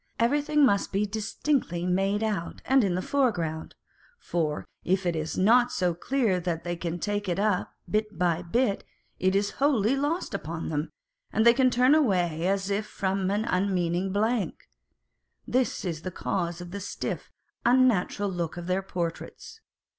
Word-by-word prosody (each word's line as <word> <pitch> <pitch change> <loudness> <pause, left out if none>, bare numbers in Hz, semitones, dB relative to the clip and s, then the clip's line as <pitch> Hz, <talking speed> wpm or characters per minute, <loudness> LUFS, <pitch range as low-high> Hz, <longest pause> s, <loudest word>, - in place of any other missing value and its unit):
Everything 290 +5 +3
must 200 -5 +1
be 200 +2 +1
dis 215 +1 -5
tinctly 180 - 0
made 195 +3 +1
out 205 -6 -3
and 265 -1 +4
in 185 -3 +1
the 185 - -2
foreground; 175 - -1 0.4
for 160 - -2 0.2
if 185 +1 +1
it 175 -1 +1
is 155 0 -3
not 240 +5 +4
so 180 -5 +1
clear 215 +1 0
that 170 -2 -3
they 175 0 -2
can 170 0 -3
take 205 +2 -2
it 175 - 0
up 200 -2 0 0.2
bit 215 0 -1
by 175 -2 +1
bit, 200 +4 0 0.4
it 185 +1 +2
is 200 +1 +1
wholly 265 -4 +3
lost 290 - -1
upon 165 -3 -4
them, 150 0 -2 0.4
and 220 - +2
they 235 - +8
turn 255 +1 +4
away 180 - +2
as 195 0 0 0.2
from 190 -1 -1
an 205 +2 0
unmeaning 185 -2 0
blank. 215 +2 0 0.8
This 255 -4 0
is 165 -3 -3
the 185 - -4
cause 175 -1 -3
of 175 0 -8
the 200 - -5
stiff, 200 - -5 0.3
unnatural 235 -5 +3
look 175 -3 -3
of 175 - -5
their 185 +2 0
portraits. 190 - -5
195 Hz, 160 wpm, -27 LUFS, 175-235 Hz, 0.8 s, they